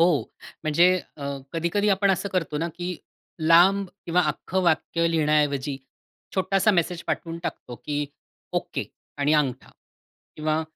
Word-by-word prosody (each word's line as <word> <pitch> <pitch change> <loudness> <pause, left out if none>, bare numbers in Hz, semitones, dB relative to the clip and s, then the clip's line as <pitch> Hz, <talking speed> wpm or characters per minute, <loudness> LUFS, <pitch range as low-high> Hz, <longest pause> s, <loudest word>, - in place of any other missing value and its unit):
हो. 170 - +6 0.6
म्हणजे 170 +4 +5 0.3
अ, 140 - -7 0.3
कधी-कधी 170 +5 +1
आपण 195 0 +3
असं 195 +2 0
करतो 165 -5 -1
ना 170 - -1
की 175 -1 -3 0.4
लांब 180 +5 +5 0.2
किंवा 175 +1 +3
अख्खं 190 +1 -1
वाक्य 165 0 +2
लिहिण्याऐवजी 150 -3 +1 0.6
छोटासा 195 +3 +3
मेसेज 175 -2 0
पाठवून 165 0 -3
टाकतो 125 -7 -5
की 145 -1 -1 0.5
ओके - - -2 0.3
आणि 145 +1 +2
अंगठा. 135 -4 0 0.7
किंवा 155 +1 0
165 Hz, 130 wpm, -25 LUFS, 150-185 Hz, 0.7 s, हो